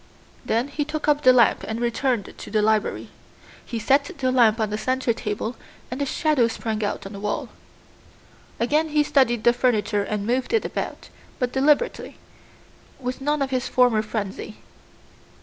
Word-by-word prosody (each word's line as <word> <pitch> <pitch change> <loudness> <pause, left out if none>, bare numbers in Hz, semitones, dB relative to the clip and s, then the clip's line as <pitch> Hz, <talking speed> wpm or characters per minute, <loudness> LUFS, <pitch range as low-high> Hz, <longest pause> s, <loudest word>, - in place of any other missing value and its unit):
Then 235 +5 0
he 295 +1 -2
took 305 +1 -4
up 295 -1 +3
the 255 - +7
lamp 245 -2 +4
and 220 +1 -3
returned 240 -1 -1
to - - -10
the 210 0 +1
library. 215 -1 0 0.5
He 235 - -5
set 275 +6 +3
the 265 -3 -2
lamp 235 -3 +4
on 215 -1 0
the 210 - -1
center 255 0 0
table 220 +2 -4 0.4
and 255 +3 -4
the 280 - 0
shadow 295 -5 +2
sprang 220 -1 -3
out 205 - -3
on 195 - -8
the 200 - -7
wall. 205 0 -3 1.1
Again 300 +7 +1
he 300 0 +3
studied 240 -6 +2
the 240 - +5
furniture 225 -4 +1
and 200 0 -3
moved 250 - -1
it 450 - +2
about, - - -5 0.3
but 250 -2 -1
deliberately, 295 - +1 0.8
with 255 0 -4
none 295 +1 +1
of 265 - -4
his 255 -1 -1
former 245 -4 +3
frenzy. 215 -1 -5
245 Hz, 170 wpm, -23 LUFS, 220-275 Hz, 1.1 s, the